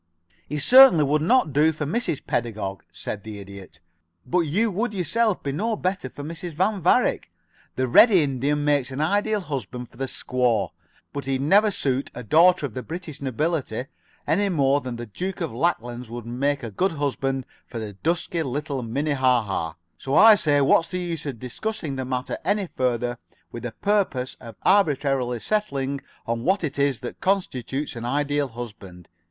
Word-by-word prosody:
"He 150 - -2
certainly 245 - +8
would 150 +2 +1
not 180 - +3
do 150 +3 +4
for 155 -1 -4
Mrs. 200 - -1
Pedagog," 105 -6 -3
said 100 -2 -6
the 110 -1 -7
Idiot. 100 -3 -11 0.5
"But 180 - +1
you 185 +8 +1
would 215 +3 -2
yourself 200 +4 0
be 140 - -2
no 215 +10 -1
better 185 -8 -2
for 145 - -9
Mrs. 165 +2 -6
Van 190 +4 +1
Varick. - - +2 0.4
The 130 0 0
red 175 - +8
Indian 145 - +1
makes 145 -3 +2
an 130 +1 -6
Ideal 205 +6 +1
Husband 125 - -5
for - - -21
the 135 +1 -2
squaw, 125 -7 0 0.4
but 140 -2 -5
he'd 135 -1 0
never 200 +9 +5
suit 135 -8 -1
a 125 - -6
daughter 165 - +4
of 130 - -6
the 130 - -4
British 165 -1 -7
nobility 135 -2 -2 0.4
any 200 +7 +2
more 140 -4 +2
than 125 -3 -5
the 120 0 -6
Duke 180 - -5
of 165 -8 -3
Lacklands 120 -4 -2
would 120 0 -7
make 135 +4 -1
a 115 - -5
good 185 - 0
husband 135 -3 -2 0.2
for 110 -4 -6
dusky 165 - -1
little 140 -1 -3
Minnehaha. 125 - 0 0.3
So 135 +1 -2
I 220 +4 +9
say 150 -8 +2
what's 165 +4 +4
the 180 - -3
use 170 -4 -4
of 135 -4 -4
discussing 145 - -4
the 130 -1 -3
matter 125 0 -3
any 200 -1 0
further 120 -1 -1 0.3
with 120 - -7
the 120 - -4
purpose 185 - 0
of 115 -2 -10
arbitrarily 135 - +2
settling 140 -11 -1 0.2
on 115 0 -2
what 190 +4 +1
it 145 -2 -3
is 140 -3 +1
that 125 - -7
constitutes 145 - -1
an 115 - -6
Ideal 145 +2 0
Husband? 105 -7 -10
140 Hz, 175 wpm, -24 LUFS, 125-175 Hz, 0.5 s, I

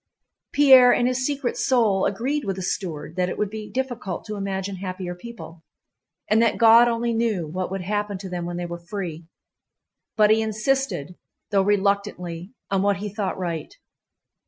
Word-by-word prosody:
Pierre 265 -3 +7
in 240 - +2
his 255 +1 0
secret 280 -4 -2
soul 220 -7 +2
agreed 265 +9 -2
with 195 -3 -2
the 190 - -5
steward 165 -4 -4
that 180 0 +1
it - - -5
would 210 -1 -1
be 215 -1 -7
difficult 245 -8 -4
to 210 - -5
imagine 195 -1 -3
happier 185 -1 -5
people, 180 -4 -11 0.7
and 215 +2 +3
that 230 -2 +2
God 230 +1 +7
only 235 0 0
knew 225 -7 0
what 180 +4 -4
would 195 0 -4
happen 205 +1 -2
to 190 +1 -8
them 175 -2 -4
when 175 0 -4
they 175 - -3
were 170 0 -6
free, 170 -3 -6 0.9
but 210 -1 +5
he 220 0 +4
insisted, 220 - -1 0.3
though 200 -1 +4
reluctantly, 200 -3 -1 0.2
on 195 -1 +2
what 200 -1 +2
he 205 +3 -4
thought 205 -3 -2
right. 170 -4 -4
200 Hz, 175 wpm, -24 LUFS, 180-230 Hz, 0.9 s, Pierre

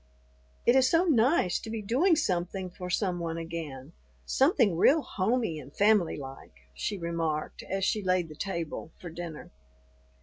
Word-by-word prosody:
"It 240 - +5
is 260 -1 +5
so 335 +4 +3
nice 255 - +3
to - - -8
be 220 -1 -4
doing 290 - +3
something 185 - -1
for 180 0 -7
some 180 -1 0
one 165 -1 -3
again, 165 -4 -6 0.3
something 265 - +3
real 290 - +4
homey 205 -4 -1
and 140 -1 -11
family 205 -1 +3
like," 135 - -10
she 200 - -3
remarked 165 -3 -2
as 195 0 -2
she 215 - +1
laid 185 -3 +1
the 155 - -11
table 170 -3 -4
for 175 - -9
dinner. 165 -2 -7
180 Hz, 160 wpm, -29 LUFS, 165-220 Hz, 0.3 s, It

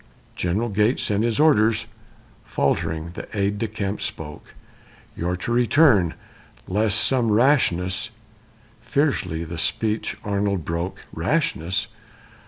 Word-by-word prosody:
"General 100 +7 -1
Gates 105 +4 +1
sent 105 -1 +1
his 115 +2 0
orders" 115 -8 +4 0.6
faltering 80 +1 -1
the - - -7
aide 100 +1 0
de 115 - -1
camp 105 -1 -4
spoke 80 -6 -6 0.6
"You're 90 +2 -1
to 90 - -4
return, 120 - +4 0.5
lest 105 +2 +1
some 125 -4 +2
rashness 105 -5 +2 0.4
" - - -31 0.3
Fiercely 120 - 0
the 85 0 -6
speech 105 +6 -1
Arnold 100 -4 -1
broke: 85 +2 -4
"Rashness! 95 +7 0
105 Hz, 115 wpm, -23 LUFS, 90-115 Hz, 0.6 s, orders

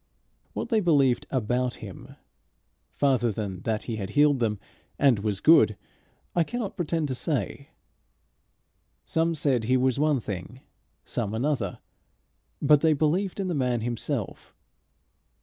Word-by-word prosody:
What - - -4
they 225 -3 +3
believed 140 - +2
about 125 0 -1
him, - - -10 0.7
farther 130 -5 +1
than 100 -4 -5
that 110 -2 -1
he 115 -3 -4
had 95 -2 -4
healed 145 +3 +3
them 105 -4 0 0.4
and 135 -7 +4
was 100 -2 -2
good, 110 -9 +5 0.6
I 170 - +4
cannot 230 +2 -4
pretend 165 -2 -1
to - - -1
say. 125 - -3 1.4
Some 165 +1 0
said 135 -6 +1
he 130 +3 +3
was 130 +1 +1
one 150 -2 +2
thing, 105 +4 -7 0.4
some 105 +2 -3
another, 120 -6 -1 0.8
but 150 -2 +5
they 160 -1 +4
believed 170 +7 0
in 195 - -1
the 180 - -1
man 125 -5 0
himself. 120 0 -4
130 Hz, 135 wpm, -26 LUFS, 110-155 Hz, 1.4 s, good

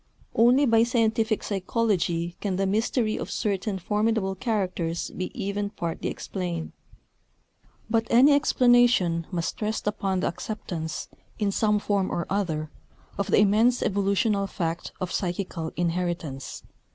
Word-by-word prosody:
Only 245 +5 +5
by 230 -3 +4
scientific 225 -2 +1
psychology 185 -4 0
can 195 -3 -1
the 195 +1 0
mystery 220 +2 0
of - - -5
certain 200 -1 -1
formidable 210 +1 0
characters 185 -6 -2
be 185 - -4
even 200 0 -2
partly 170 -5 -4
explained; 175 -4 -4 1.2
but 225 0 +1
any 265 +5 +6
explanation 245 - +4
must 170 +1 -3
rest 215 +1 -2
upon 195 -3 -1
the - - +1
acceptance, 170 -3 -5 0.3
in 205 -3 0
some 210 +1 +2
form 200 -2 0
or 170 - -2
other, 160 -6 -1 0.5
of 200 - 0
the - - +4
immense 215 +5 +4
evolutional 200 0 +1
fact 170 -3 -3
of 185 -2 -3
psychical 175 -3 -3
inheritance. 170 -5 -3
200 Hz, 130 wpm, -26 LUFS, 175-220 Hz, 1.2 s, any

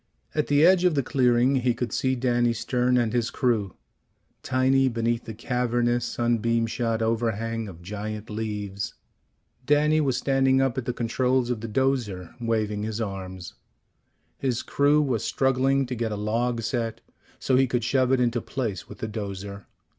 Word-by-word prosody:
At 150 - 0
the 145 +2 +4
edge 180 0 +5
of 180 -4 +3
the 140 - +1
clearing 125 +1 +3
he 125 -2 +1
could 120 -2 -3
see 130 0 +1
Danny 120 -1 +1
Stern 125 +2 +1
and 120 -2 +1
his 120 -2 +1
crew, 110 -7 0 0.7
tiny 130 +1 +2
beneath 115 0 -1
the 110 - -6
cavernous 120 0 0
sunbeam 115 -1 +1
shot 115 0 -1
overhang 115 0 -1
of 85 -3 -11
giant 105 +3 -5
leaves. 105 -2 -4 0.7
Danny 150 +1 +4
was 135 -4 +1
standing 135 0 +2
up 135 -3 +1
at 125 - -6
the 125 - 0
controls 125 +1 0
of 115 -3 -3
the 115 - -4
'dozer, 110 -7 -1
waving 110 -3 -1
his 110 +1 -3
arms. 95 -4 -5 0.9
His 130 -3 -1
crew 145 +1 +3
was 125 -7 -1
struggling 135 +1 +2
to 125 - -5
get 115 -2 -2
a - - -2
log 115 +3 -1
set 115 0 -2 0.4
so 130 - +1
he 130 +1 +4
could 125 -2 -1
shove 130 +1 +2
it 130 - +3
into 120 -1 +1
place 110 -8 -4
with - - -10
the 110 - -4
'dozer. 100 -2 -6
120 Hz, 170 wpm, -25 LUFS, 110-130 Hz, 0.9 s, edge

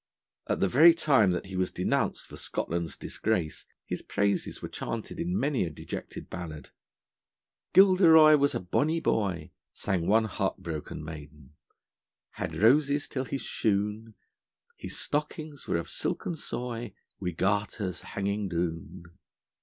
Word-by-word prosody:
At - - -1
the 100 - +4
very 160 - +7
time 135 - +4
that 90 +1 -1
he 95 0 -8
was 90 0 +1
denounced 90 - -1
for - - -11
Scotland's 85 -1 -3
disgrace, 90 -8 -2 0.2
his - - -4
praises 100 0 -1
were - - -5
chanted 115 +6 -5
in 175 +3 -1
many 140 -6 +1
a 85 - -2
dejected 75 - -7
ballad. 80 -4 -7 1.0
'Gilderoy 170 -5 +8
was 140 0 +2
a - - 0
bonny 150 - 0
boy,' 95 - -1 0.2
sang 90 -4 -1
one 110 +2 +4
heart 100 -3 -2
broken 80 -2 -6
maiden: 75 -2 -10 0.8
Had - - -5
roses 140 +6 +3
till 130 -1 -3
his 135 +1 -4
shoon, 105 +1 -1 0.6
His - - -4
stockings 150 0 -3
were - - +1
of 85 0 -4
silken 170 - -2
soy, 120 -7 -5 0.2
Wi' 90 -2 -2
garters 100 0 -1
hanging 100 0 -2
doon. 85 0 -3
105 Hz, 140 wpm, -28 LUFS, 90-140 Hz, 1.0 s, Gilderoy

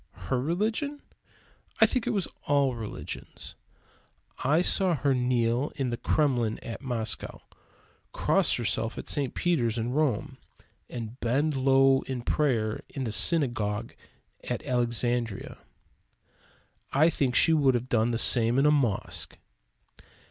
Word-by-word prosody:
Her 125 -2 +1
religion? 220 - -2 0.8
I - - +8
think 255 - -1
it - - +2
was 195 -4 0 0.2
all 140 -2 +2
religions. 110 -3 -7 0.9
I 150 +6 +3
saw 185 -2 +2
her 140 0 +1
kneel 125 +1 0
in 135 -4 -2
the - - -1
Kremlin 125 -8 0
at 115 - -7
Moscow, 115 -5 -4 0.7
cross - - +2
herself - - -2
in - - -6
St. 140 -4 -1
Peter's 125 -11 0
at 115 - -1
Rome, 130 -2 -1 0.5
and 120 0 -7
bend 140 +6 0
low 135 0 +4
at 125 -2 -4
prayer 115 -8 0
in 135 - -5
the 115 - -3
Synagogue 115 -6 +1 0.5
at - - -4
Alexandria. 120 -3 -1 1.3
I 155 +5 +4
think 130 -6 0
she 165 - +6
would 140 -5 +3
have 120 +1 -2
done 115 -2 +1
the 115 - -1
same 115 +1 +4
in 135 - +3
a 150 - +5
mosque. 125 -9 -1
130 Hz, 135 wpm, -27 LUFS, 120-145 Hz, 1.3 s, I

